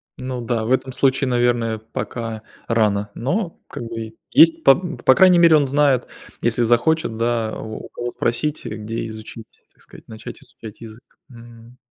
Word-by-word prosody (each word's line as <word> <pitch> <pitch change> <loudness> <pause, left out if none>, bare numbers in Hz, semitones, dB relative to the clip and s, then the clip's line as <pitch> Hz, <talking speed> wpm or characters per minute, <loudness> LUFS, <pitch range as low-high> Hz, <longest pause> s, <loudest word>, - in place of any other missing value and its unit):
Ну 125 -1 -5
да 115 -1 -1
в 115 - -3
этом 130 0 +1
случае 135 0 +1
наверное 120 -2 +1
пока 115 0 -6 0.3
рано, 105 -3 +1
но 170 - -3
как - - -7
бы 115 -1 -7 0.2
есть 165 0 +6
по 135 - +7 0.2
по 130 - +4
крайней 185 -2 +6
мере 170 -2 +6
он 145 - +1
знает 140 -2 +2 0.3
если 120 +1 +2
захочет 120 +1 +1
да 115 -1 -1
у 110 0 -7
у - - -13
кого 120 0 -5
спросить, 145 +6 -2
где 110 +2 -5
изучить, 110 +1 -11
так - - -23
сказать, - - -16
начать 110 0 -10
изучать 110 -1 -13
язык. 110 +1 -11 0.3
Мгм. 120 0 -15
120 Hz, 165 wpm, -20 LUFS, 110-130 Hz, 0.3 s, по